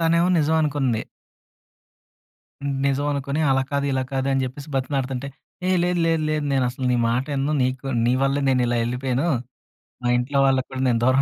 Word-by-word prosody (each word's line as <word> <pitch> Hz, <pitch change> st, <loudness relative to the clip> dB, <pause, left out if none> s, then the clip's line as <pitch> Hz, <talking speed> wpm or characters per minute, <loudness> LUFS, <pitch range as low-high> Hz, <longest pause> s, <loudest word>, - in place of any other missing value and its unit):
తనేమో 170 Hz, +1 st, +3 dB
నిజం 160 Hz, +1 st, +2 dB
అనుకుంది. 135 Hz, -6 st, 0 dB, 1.8 s
నిజం 140 Hz, +1 st, 0 dB
అనుకుని 140 Hz, +2 st, -2 dB
అలా 135 Hz, 0 st, +3 dB
కాదు, 140 Hz, 0 st, 0 dB
ఇలా 130 Hz, -, 0 dB
కాదు 135 Hz, 0 st, -1 dB
అని 135 Hz, -1 st, +1 dB
చెప్పేసి 140 Hz, +4 st, -7 dB
బతిమిలాడుతుంటే, 135 Hz, 0 st, -2 dB, 0.4 s
"ఏ -, -, +3 dB
లేదు 175 Hz, 0 st, +1 dB
లేదు 165 Hz, -1 st, +1 dB
లేదు, 150 Hz, -1 st, -1 dB
నేను 135 Hz, -2 st, +2 dB
అసలు 130 Hz, +1 st, -6 dB
నీ -, -, +2 dB
మాటా 125 Hz, +4 st, 0 dB
వినను, 140 Hz, +2 st, 0 dB
నీకు 130 Hz, +1 st, -2 dB, 0.2 s
నీ 120 Hz, -, +3 dB
వల్లే 135 Hz, +1 st, +1 dB
నేను 130 Hz, -2 st, +3 dB
ఇలా 120 Hz, 0 st, 0 dB
ఎళ్ళిపోయాను. 125 Hz, +5 st, -1 dB, 0.7 s
మా 120 Hz, -, -1 dB
ఇంట్లో 135 Hz, +3 st, -1 dB
వాళ్ళకి 130 Hz, -1 st, +2 dB
కూడా 130 Hz, 0 st, -4 dB
నేను 115 Hz, -2 st, +2 dB
దూరం 130 Hz, +2 st, +4 dB
135 Hz, 175 wpm, -23 LUFS, 130-145 Hz, 1.8 s, దూరం